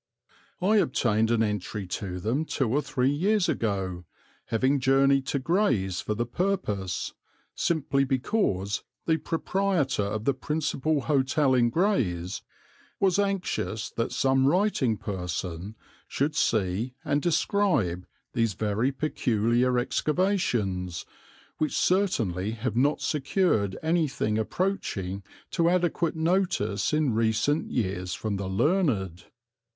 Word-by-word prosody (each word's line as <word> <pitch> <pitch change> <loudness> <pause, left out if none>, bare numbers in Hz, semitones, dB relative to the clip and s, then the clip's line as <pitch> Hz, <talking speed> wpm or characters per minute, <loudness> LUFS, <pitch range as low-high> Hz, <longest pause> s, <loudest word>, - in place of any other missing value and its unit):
I 210 +3 +4
obtained 115 - +2
an 115 -1 +3
entry 105 -1 -3
to 90 0 -4
them 115 - 0
two 135 -4 -1
or 135 +7 +1
three 135 -3 0
years 190 +6 +2
ago, 95 - -2 0.4
having 130 +5 +1
journeyed 135 0 +3
to 145 - 0
Grays 130 - +1
for 105 - -2
the 120 +2 -1
purpose, 120 - -2 0.4
simply 140 -4 +1
because 130 - 0 0.2
the 160 -1 +2
proprietor 170 - 0
of 105 +2 -3
the 140 - +3
principal 150 +1 -1
hotel 140 -1 +2
in 120 -2 +4
Grays 115 - 0 0.6
was 195 0 +3
anxious 195 - -1
that 115 - -2
some 135 0 +2
writing 150 - +2
person 90 0 -4 0.3
should 150 +3 -1
see 110 +1 0
and 145 -1 +1
describe 155 - +1 0.3
these 115 -4 +1
very 110 +6 0
peculiar 125 -3 +1
excavations, 120 - 0 0.5
which 155 - 0
certainly 115 - +1
have 115 +1 -3
not 140 +5 +2
secured 135 - +1
anything 155 -10 +1
approaching 105 - -2 0.3
to 170 -1 +2
adequate 175 -2 +1
notice 160 - 0
in 150 -5 +1
recent 115 +7 +1
years 95 -5 -2
from 105 -2 -3
the 95 -1 -4
learned. 100 - 0
130 Hz, 115 wpm, -27 LUFS, 105-160 Hz, 0.6 s, I